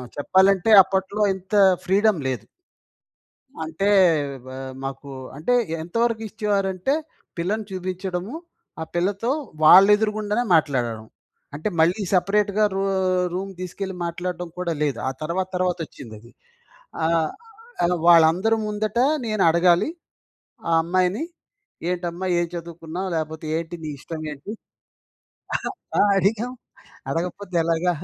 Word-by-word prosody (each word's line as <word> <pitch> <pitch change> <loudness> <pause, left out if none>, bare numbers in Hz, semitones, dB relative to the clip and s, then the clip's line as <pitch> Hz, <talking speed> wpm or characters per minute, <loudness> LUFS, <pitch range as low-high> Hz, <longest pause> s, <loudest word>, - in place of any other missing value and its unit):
చెప్పాలంటే 190 +6 +3
అప్పట్లో 190 +2 -2
ఇంత 190 +1 -13 0.3
ఫ్రీడమ్ 200 0 +3
లేదు. 125 -4 -3 1.2
అంటే 160 +5 -1 0.7
ఆహ్, 130 0 -6
మాకు 135 +1 -6 0.3
అంటే 160 +11 -1 0.3
ఎంతవరకు 230 +6 -1
ఇచ్చేవారంటే 205 +1 0 0.4
పిల్లని 205 +6 -1
చూపించడము, 185 - -4 0.5
ఆ - - -2
పిల్లతో 200 +7 0 0.3
వాళ్ళ 185 +5 +9
ఎదురుగుండానే 215 +2 -1
మాట్లాడడం. 125 -8 +1 0.5
అంటే 155 +8 -2
మళ్ళీ 175 +6 +3
సెపరేట్‌గా 200 +3 +2
రూ 195 - -1 0.5
రూమ్ 195 +2 -4
తీసుకెళ్ళి 185 +1 -5
మాట్లాడటం 175 +1 -4
కూడా 180 -2 -1
లేదు. 140 -6 0
ఆ - - 0
తర్వాత 180 +4 -2
తర్వాత 180 -1 0
వచ్చిందది. 115 -2 -12 0.7
ఆహ్, 165 -1 +2 0.8
వాళ్ళందరి 175 +6 +5
ముందట 210 +2 -2 0.3
నేనడగాలి. 175 - +3 0.8
ఆ - - +1
అమ్మాయిని, 185 - +1 0.7
ఏంటమ్మా 175 0 -3
ఏం 175 - 0
చదువుకున్నావు, 170 +2 -6
లేకపోతే 160 0 -4
ఏంటి 165 +1 -5
నీ 155 - -4
ఇష్టం 160 +1 -7
ఏంటి? 150 +9 -8 1.5
ఆహ్, 205 - +5
అడిగాము 225 +6 0 0.5
అడగకపోతే 180 +5 -4
ఎలాగా? 170 +2 +1
180 Hz, 105 wpm, -23 LUFS, 165-200 Hz, 1.5 s, వాళ్ళ